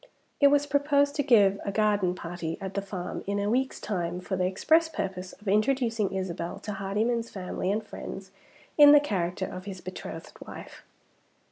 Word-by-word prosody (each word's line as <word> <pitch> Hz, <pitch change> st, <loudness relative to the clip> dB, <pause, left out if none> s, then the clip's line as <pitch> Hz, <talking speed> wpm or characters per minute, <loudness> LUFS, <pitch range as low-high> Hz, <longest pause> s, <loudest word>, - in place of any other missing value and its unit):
It 285 Hz, -, +7 dB
was 285 Hz, 0 st, +3 dB
proposed 285 Hz, 0 st, +2 dB
to -, -, +3 dB
give 205 Hz, -7 st, +4 dB
a 200 Hz, -, -2 dB
garden 205 Hz, -3 st, +1 dB
party 170 Hz, -2 st, -5 dB
at 190 Hz, 0 st, -6 dB
the 200 Hz, -, -1 dB
farm 190 Hz, -2 st, -5 dB
in 200 Hz, 0 st, -1 dB
a 205 Hz, +1 st, 0 dB
week's 260 Hz, +2 st, 0 dB
time 180 Hz, -3 st, -3 dB
for 190 Hz, +1 st, -3 dB
the 180 Hz, 0 st, +1 dB
express 320 Hz, -, +3 dB
purpose 190 Hz, -, -4 dB
of 205 Hz, +2 st, -15 dB
introducing 225 Hz, 0 st, +1 dB
Isabel 175 Hz, -2 st, -3 dB
to 210 Hz, -, -5 dB
Hardyman's 215 Hz, +4 st, -1 dB
family 185 Hz, 0 st, -3 dB
and 215 Hz, +1 st, -2 dB
friends -, -, -8 dB, 0.5 s
in 290 Hz, 0 st, +10 dB
the 295 Hz, -, +9 dB
character 185 Hz, -8 st, -2 dB
of 185 Hz, 0 st, -8 dB
his 195 Hz, -2 st, -6 dB
betrothed 185 Hz, +1 st, -8 dB
wife. -, -, -10 dB
200 Hz, 175 wpm, -28 LUFS, 185-245 Hz, 0.5 s, in